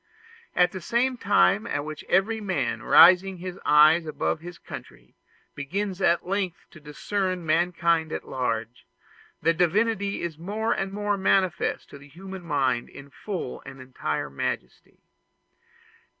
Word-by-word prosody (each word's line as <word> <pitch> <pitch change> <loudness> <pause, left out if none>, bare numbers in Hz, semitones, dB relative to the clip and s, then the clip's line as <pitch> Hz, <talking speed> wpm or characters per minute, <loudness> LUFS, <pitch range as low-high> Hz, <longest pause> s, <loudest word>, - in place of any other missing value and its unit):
At 180 0 +4
that 185 - -7
same 245 +8 0
time 205 0 +2
at 145 -6 -2
which 155 -1 -7
every 220 +4 +2
man, 145 - -2
raising 185 +5 +6
his 180 +1 -7
eyes 155 +2 +5
above 155 - -2
his 175 +1 -10
country, 60 +1 -11 0.4
begins 190 +7 -4
at 170 -2 +2
length 190 -2 -3
to 155 - -14
discern 185 +4 -3
mankind 165 0 +1
at - - -5
large, 120 -2 -3 0.6
the 165 - +4
Divinity 200 +4 0
is 160 -3 -5
more 215 +6 -1
and 195 -3 -3
more 205 0 -1
manifest 190 -2 +1
to 140 - -11
the 140 - -15
human 190 +5 -9
mind 135 -7 0
in 140 0 -13
full 185 -8 -6
and 135 -1 -11
entire 125 - -4
majesty. 60 -2 -5
175 Hz, 140 wpm, -25 LUFS, 150-195 Hz, 0.6 s, raising